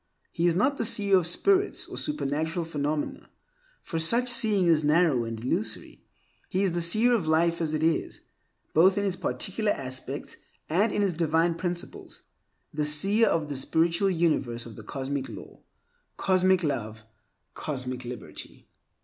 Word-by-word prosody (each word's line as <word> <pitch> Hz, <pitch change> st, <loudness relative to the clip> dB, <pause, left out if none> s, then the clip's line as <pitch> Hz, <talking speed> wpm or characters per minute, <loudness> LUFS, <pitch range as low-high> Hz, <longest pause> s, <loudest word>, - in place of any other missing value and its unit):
He 170 Hz, +1 st, +1 dB
is 170 Hz, -, +2 dB
not 270 Hz, +9 st, +2 dB
the -, -, -1 dB
seer 200 Hz, -3 st, +4 dB
of 180 Hz, -3 st, +3 dB
spirits 395 Hz, -, +1 dB
or -, -, -9 dB
supernatural 160 Hz, -, -2 dB
phenomena, 150 Hz, -1 st, -3 dB, 0.5 s
for 165 Hz, -, -3 dB
such 235 Hz, +10 st, +3 dB
seeing 215 Hz, -6 st, +3 dB
is 160 Hz, -3 st, +3 dB
narrow 150 Hz, -5 st, +3 dB
and 115 Hz, -1 st, -5 dB
illusory. 110 Hz, -2 st, -3 dB, 0.5 s
He 190 Hz, +2 st, 0 dB
is 190 Hz, -, +1 dB
the 170 Hz, 0 st, -1 dB
seer 215 Hz, +9 st, +4 dB
of 200 Hz, -9 st, 0 dB
life 170 Hz, +2 st, +2 dB
as 155 Hz, -1 st, 0 dB
it 155 Hz, -, -2 dB
is, 165 Hz, 0 st, 0 dB, 0.5 s
both 185 Hz, +5 st, +5 dB
in 205 Hz, -, 0 dB
its 190 Hz, -2 st, 0 dB
particular 205 Hz, +3 st, -2 dB
aspects 130 Hz, -4 st, -6 dB, 0.3 s
and 200 Hz, +7 st, +2 dB
in 205 Hz, -, 0 dB
its 195 Hz, -3 st, +1 dB
divine 165 Hz, +1 st, +1 dB
principles; 175 Hz, 0 st, -6 dB, 0.5 s
the 150 Hz, -, -1 dB
seer 195 Hz, +10 st, +3 dB
of 160 Hz, -2 st, 0 dB
the 145 Hz, -, -5 dB
spiritual 165 Hz, +7 st, +1 dB
universe 150 Hz, -9 st, 0 dB
of 115 Hz, -3 st, -10 dB
cosmic 135 Hz, -1 st, -4 dB
law, -, -, -11 dB, 0.6 s
cosmic 185 Hz, -1 st, +2 dB
love, 110 Hz, -7 st, -3 dB
and 110 Hz, -, -29 dB, 0.4 s
cosmic 130 Hz, -3 st, -5 dB
liberty. 125 Hz, 0 st, -9 dB
165 Hz, 160 wpm, -27 LUFS, 145-190 Hz, 0.6 s, both